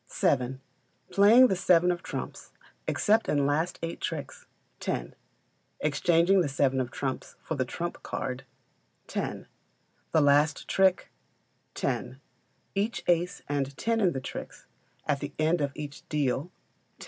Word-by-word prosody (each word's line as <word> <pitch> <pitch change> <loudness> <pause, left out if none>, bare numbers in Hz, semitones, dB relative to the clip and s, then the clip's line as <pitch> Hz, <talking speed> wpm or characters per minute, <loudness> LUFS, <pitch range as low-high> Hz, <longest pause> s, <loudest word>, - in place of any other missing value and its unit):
vii. 130 -1 +2 0.5
Playing 220 +6 +7
the 195 - +2
seven 180 -1 +4
of 175 -1 -3
trumps - - -6 0.4
except 220 +2 +2
in 145 -2 +2
last 155 +5 0
eight 165 - -4
tricks - - -5 0.3
10; - - -3 0.7
exchanging 170 +5 +3
the 155 - 0
seven 135 -1 +2
of 125 - -3
trumps 130 +1 -4
for - - -3
the 130 -4 0
trump 170 +7 -5
card 130 0 -4 0.6
10; - - -4 0.7
the 160 - +4
last 145 +1 +3
trick 190 -1 +2 0.6
10; - - -2 0.5
each 200 -2 -1
ace 175 +2 +1
and 140 -1 -2
ten 230 0 0
in 180 -5 +3
the 130 - -2
tricks 130 - -8 0.4
at 145 -2 +1
the 145 0 -6
end 160 +2 +2
of 140 -1 0
each 145 -1 -7
deal 140 -2 0
10. 180 - -20
155 Hz, 140 wpm, -28 LUFS, 140-180 Hz, 0.7 s, Playing